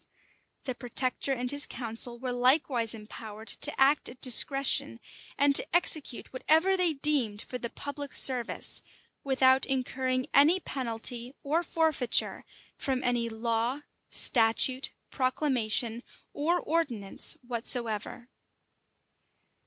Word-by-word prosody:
The 260 - -4
protector 250 +2 0
and 250 -1 0
his 285 0 0
council 235 0 -4
were 250 +1 -5
likewise 245 -2 +1
empowered 215 0 -11
to 295 - +4
act 275 +3 +2
at 245 - -14
discretion, 260 - +3 0.4
and 280 0 +2
to - - +5
execute 310 -9 0
whatever 320 +8 +2
they 360 -3 0
deemed 275 -8 0
for 250 - -8
the 235 - -5
public 285 +2 -8
service, 250 -3 +2 0.4
without 265 -1 +2
incurring 255 -1 -2
any 310 +7 +4
penalty 245 -3 -3
or 310 +4 -1
forfeiture 320 -7 0 0.3
from 265 -2 -3
any 240 -1 -1
law, 230 +4 -3 0.3
statute, 245 +3 +2 0.2
proclamation, 245 -4 -1 0.3
or 335 +5 -1
ordinance 255 - +1
whatsoever. 235 -1 -1
255 Hz, 110 wpm, -27 LUFS, 235-285 Hz, 0.4 s, to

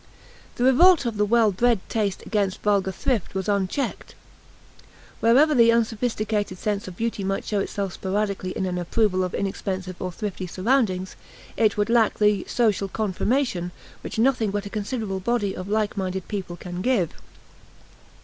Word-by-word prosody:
The 245 - -1
revolt 305 +5 +6
of 230 -3 -2
the 210 0 +2
well 225 -1 +4
bred 235 +3 +2
taste 205 -4 -1
against 200 -3 -1
vulgar 200 -2 +2
thrift 215 0 -2
was 190 -1 -2
unchecked. 200 +6 -2 1.0
Wherever 270 +7 +5
the 230 -3 +6
unsophisticated 220 -3 0
sense 205 0 -2
of 180 -1 -9
beauty 230 -3 -2
might 195 +1 -2
show 210 - -1
itself 195 -1 -3
sporadically 200 -1 -2
in 190 - -1
an 180 -1 -2
approval 185 +1 +1
of 180 - -3
inexpensive 190 -2 -3
or 185 - -3
thrifty 190 -1 -5
surroundings, 190 -1 0 0.4
it 215 -2 +2
would 205 +2 +1
lack 230 -3 +3
the 210 -2 +3
"social 210 -5 +1
confirmation" 210 -1 -1 0.3
which - - -6
nothing 235 -2 +2
but 205 +1 -3
a 200 - -7
considerable 210 -2 -3
body 205 -1 -1
of 185 +2 -6
like 215 0 0
minded 190 -2 -3
people 190 -4 -4
can 175 0 -6
give. 210 -8 +1
205 Hz, 160 wpm, -24 LUFS, 190-230 Hz, 1.0 s, revolt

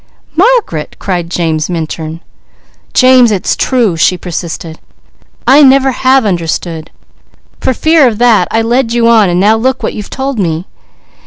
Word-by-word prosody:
"Margaret!" 390 - 0
cried 175 -3 -3
James 160 -3 -2
Minturn. 160 -1 -5 0.7
"James, 255 -2 +4
it's 195 -2 -1
true!" 235 -9 0
she 180 +3 +1
persisted. 165 -2 -6 0.7
"I 280 +3 +5
never 270 -1 +4
have 260 0 +2
understood. 165 -3 -3 0.7
For 260 - -1
fear 315 -1 +3
of 225 -3 -2
that, 240 -2 +3
I 225 0 0
led 235 +1 0
you 235 -1 +2
on 220 -4 +4
and 175 0 0
now 210 +3 +3
look 260 +3 -1
what - - -2
you've 210 -2 -8
told 265 -2 -4
me. 165 -2 -2
215 Hz, 150 wpm, -11 LUFS, 170-260 Hz, 0.7 s, I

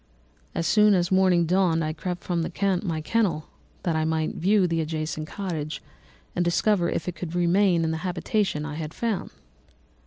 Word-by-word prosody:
As 165 - -1
soon 210 +3 +5
as 175 0 +1
morning 185 -2 +4
dawned 175 -2 +2
I 155 0 -2
crept 175 +2 -5
from 170 -2 -1 0.4
my 165 -5 -2
kennel, 170 -5 0 0.3
that 170 -4 0
I 160 - +1
might 160 0 0
view 195 +2 +3
the 165 -2 0
adjacent 155 0 -3
cottage 160 -6 -4 0.6
and 175 - +2
discover 175 +1 +2
if 160 - -3
I - - 0
could 170 0 -6
remain 175 0 +3
in 160 - 0
the 160 - -2
habitation 180 -1 -1
I 150 - -5
had 160 -1 -5
found. 225 -5 -2
175 Hz, 175 wpm, -25 LUFS, 160-190 Hz, 0.6 s, soon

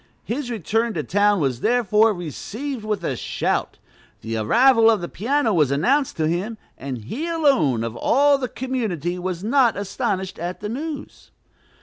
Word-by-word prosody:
His 250 +2 -4
return 225 +1 -1
to 155 - -1
town 205 +3 +2
was 135 -5 0
therefore 225 -2 +3
received 215 - -5
with 210 -4 -2
a 135 - -1
shout. - - -2 0.4
The 115 +1 -4
arrival 230 - +5
of 220 -2 +3
the 175 - -4
piano 240 +4 0
was 150 -7 +3
announced 250 - +1
to 155 -1 +1
him, 190 +8 -2 0.2
and 135 -2 -5
he 275 - -4
alone 270 - +2
of 115 0 -4
all 280 - +3
the 255 - -2
community 215 - -3
was 180 0 -4
not 240 -1 +3
astonished 190 -1 -3
at 175 +2 -4
the 210 - -5
news. 290 +4 -6
210 Hz, 160 wpm, -22 LUFS, 170-255 Hz, 0.4 s, arrival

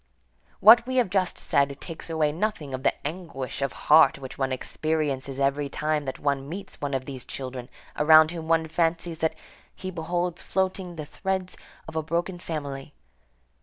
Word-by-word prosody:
What 230 +3 +8
we 260 - -2
have 245 -8 +2
just 185 -3 +1
said 140 -1 +1
takes 165 -1 -7
away 155 -2 +1
nothing 165 -5 -2
of 130 - -3
the - - +3
anguish 150 -7 -6
of 135 - 0
heart 155 0 +5
which 130 -2 -8
one 135 -1 -1
experiences 140 -1 -2
every 140 +1 +1
time 150 0 -1
that 130 - -4
one 140 -1 -1
meets 195 +4 -8
one 140 -1 -1
of 130 -1 -2
these 130 -3 -6
children 130 -1 -6 0.3
around 155 +1 +7
whom 165 -2 -6
one 165 0 +2
fancies 165 0 0
that 160 - 0 0.4
he 185 0 -6
beholds 175 +1 -2
floating 190 -2 -2
the 155 -2 -6
threads 190 +3 -3 0.3
of - - -9
a 160 - +1
broken 170 +3 -2
family. 145 -4 -5
160 Hz, 170 wpm, -26 LUFS, 140-175 Hz, 0.4 s, What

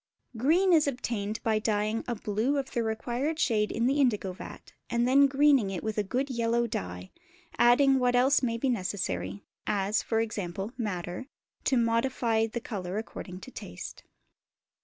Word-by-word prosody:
Green 335 - +3
is 310 -3 +5
obtained 225 -5 -2
by 220 -1 +2
dyeing 215 +1 0
a 240 - -1
blue 215 +7 0
of 270 -1 -3
the 235 - 0
required 240 +7 -2
shade 220 -9 +1
in 230 - 0
the 275 +3 +3
indigo 210 -7 +1
vat, 185 - -11 0.2
and 235 0 +1
then 275 +2 +6
greening 275 -5 +4
it 190 -3 -4
with 220 -1 -2
a - - +2
good 260 +7 -2
yellow 235 0 +1
dye, 90 - -5 0.5
adding 265 +3 +5
what 245 -1 +2
else 265 +3 +4
may 230 -3 0
be 270 - -1
necessary 100 - -2 0.2
(as, 205 0 +1 0.2
e.g., 215 -4 -2 0.3
madder) 185 -1 -4 0.4
to 265 - +3
modify 230 -1 +1
the 230 +2 -4
colour 195 -5 -5
according 185 -4 -6
to 260 - -10
taste. - - -8
230 Hz, 160 wpm, -29 LUFS, 210-260 Hz, 0.5 s, then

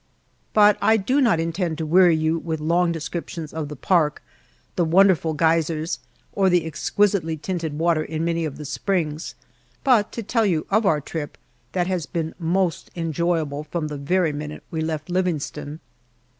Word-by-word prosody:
But 210 -1 +6
I 225 - +4
do 255 +8 +1
not 230 -10 +3
intend 165 0 -1
to 160 - -3
weary 175 +1 +5
you 160 +1 +1
with 160 -2 -3
long 170 +3 +2
descriptions 165 -1 -5
of 160 -2 -3
the 150 - -6
park, 155 0 +1 0.5
the 175 - +2
wonderful 170 -2 +4
geysers, 160 0 +1 0.3
or 195 -1 +2
the 175 -2 +2
exquisitely 165 +1 0
tinted 160 -2 -3
water 165 -1 +2
in 160 +1 -3
many 170 0 0
of 155 -3 -4
the 150 - -7
springs, 155 0 -2 0.5
but 240 -6 +3
to 230 - -4
tell 225 +1 +1
you 165 -5 0
of 215 +1 +3
our 155 -5 +2
trip, 150 +1 -6 0.4
that 180 -1 +1
has 180 -4 -2
been 160 -1 -3
most 175 +1 0
enjoyable 165 -3 -1
from 155 0 -3
the 150 - -5
very 160 +3 +1
minute 150 +1 -6
we 160 - -2
left 155 -1 -3
Livingstone. 155 -4 -2
165 Hz, 170 wpm, -23 LUFS, 155-180 Hz, 0.5 s, But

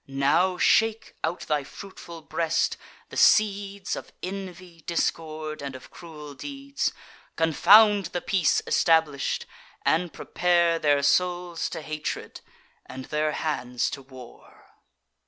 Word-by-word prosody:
Now 140 +7 +2
shake, 225 +3 +2
out 175 - -2
thy 150 -2 -1
fruitful 170 0 -11
breast, 165 +1 0 0.3
the - - -8
seeds 200 -2 +3
Of - - -9
envy, 185 -3 -7
discord, 155 -2 -2
and 140 -2 -6
of 130 - -12
cruel 150 -4 -10
deeds: 275 - -4 0.4
Confound 200 +5 +5
the 175 +1 -3
peace 180 -3 +1
establish'd, 160 -4 +2 0.4
and 170 +1 +2
prepare 170 -1 +1
Their 145 -2 +2
souls 175 +2 +1
to 160 - -6
hatred, 155 0 -5 0.5
and 130 0 -8
their 150 +1 -1
hands 125 -6 -2
to 140 - -6
war." 130 -2 -15
165 Hz, 120 wpm, -26 LUFS, 150-185 Hz, 0.5 s, Confound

